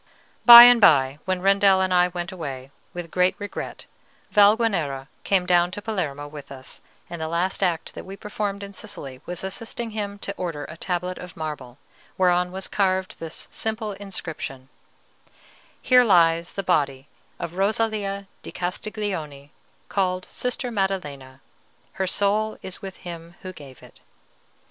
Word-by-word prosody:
By 235 0 +13
and 245 -1 +7
by, 140 -5 +5
when 185 -1 -1
Rendel 195 -1 +5
and 185 -1 +1
I 180 0 +5
went 175 +1 -5
away, 135 -7 -7 0.2
with 175 -2 -7
great 180 0 +2
regret, 205 -1 -7 0.5
Valguanera 200 - +3
came 190 -2 +2
down 175 -1 +3
to 185 - -6
Palermo 150 -10 -3
with 145 -2 -11
us; 130 -1 -10 0.3
and 170 -2 -7
the 160 - -2
last 170 +5 -1
act 175 -4 0
that - - -8
we 195 +1 -9
performed 205 -1 -4
in 200 0 -8
Sicily 135 -8 -8
was 180 0 -4
assisting 225 +4 -5
him 205 -2 -4
to 200 -1 -5
order 165 -5 -4
a - - -9
tablet 180 0 -3
of 180 -2 -10
marble, 145 -6 -6 0.4
whereon 180 -1 +2
was 190 +1 -5
carved 190 -2 0
this 165 -1 -7
simple 220 -1 -3
inscription: 165 -9 -6 1.1
HERE 250 -1 +6
LIES 170 -5 +3
THE 195 - -3
BODY 140 -7 0 0.3
OF 170 - -5
ROSALIA 200 0 0 0.2
DI - - -9
CASTIGLIONI, 175 -7 -4 0.4
CALLED 185 -2 -1
SISTER 250 0 -3
MADDELENA. 145 - -3 0.5
HER 190 - -2
SOUL 210 +3 +1
IS 190 - -6
WITH 190 -1 -8
HIM 170 -1 -9
WHO 185 -1 -7
GAVE 140 -6 -13
IT. - - -16
185 Hz, 150 wpm, -24 LUFS, 160-200 Hz, 1.1 s, By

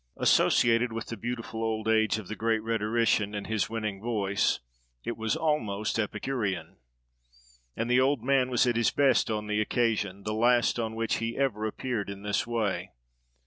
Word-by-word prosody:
Associated 115 +1 +3
with 115 0 -5
the 115 - -4
beautiful 115 0 -4
old 110 -1 -2
age 110 -1 +3
of 110 -4 -7
the 110 - -5
great 110 -1 0
rhetorician, 110 -1 +1
and 105 - -4
his 110 -2 -1
winning 110 -3 -3
voice, 105 -4 0 0.4
it 120 - -3
was 110 -1 -1
almost 110 -10 -1
Epicurean. 105 -7 -2 1.0
And 115 - -1
the 125 +1 +4
old 135 -2 +1
man 130 -1 +2
was 125 0 +3
at 120 -2 +1
his 120 - +3
best 135 -5 +3
on 105 -1 -2
the 105 0 0
occasion; 105 -4 0
the 105 - -2
last 120 +2 +3
on 110 -1 -2
which 115 -1 0
he 115 0 -3
ever 110 -6 0
appeared 110 -2 -3
in 100 0 -7
this 105 +4 -1
way. 110 -5 -2
110 Hz, 175 wpm, -28 LUFS, 105-120 Hz, 1.0 s, the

